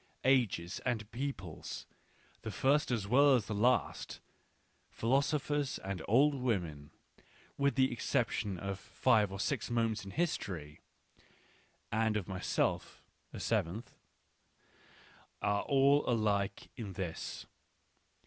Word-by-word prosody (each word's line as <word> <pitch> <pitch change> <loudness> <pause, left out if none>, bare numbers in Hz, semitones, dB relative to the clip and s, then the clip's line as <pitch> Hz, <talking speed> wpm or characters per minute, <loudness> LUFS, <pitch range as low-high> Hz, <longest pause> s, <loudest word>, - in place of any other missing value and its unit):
Ages 115 -10 +2
and 110 -4 -2
peoples, 120 - -5 0.6
the - - -5
first 145 +3 +2
as 115 -5 0
well 140 +4 +6
as 115 -5 0
the 110 - -4
last, 120 +5 +1 0.7
philo 130 +5 +2
sophers 145 -1 -1
and 95 -1 -5
old 140 +7 +5
women, 90 - -2 0.7
with 140 0 +1
the 130 -1 +3
exception 115 -5 -1
of 100 +1 -4
five 105 +1 +2
or 95 - -6
six 130 +3 -1
moments 115 -3 0
in 100 - -8
history 95 - -3 1.1
(and 110 0 +2
of 100 - -4
myself, 95 -1 -1 0.3
the - - -7
seventh), 100 +9 -1 1.5
are 100 0 +1
all 140 +1 +4
alike 105 -4 0
in 105 -6 -6
this. 90 -3 -5
110 Hz, 115 wpm, -33 LUFS, 100-135 Hz, 1.5 s, well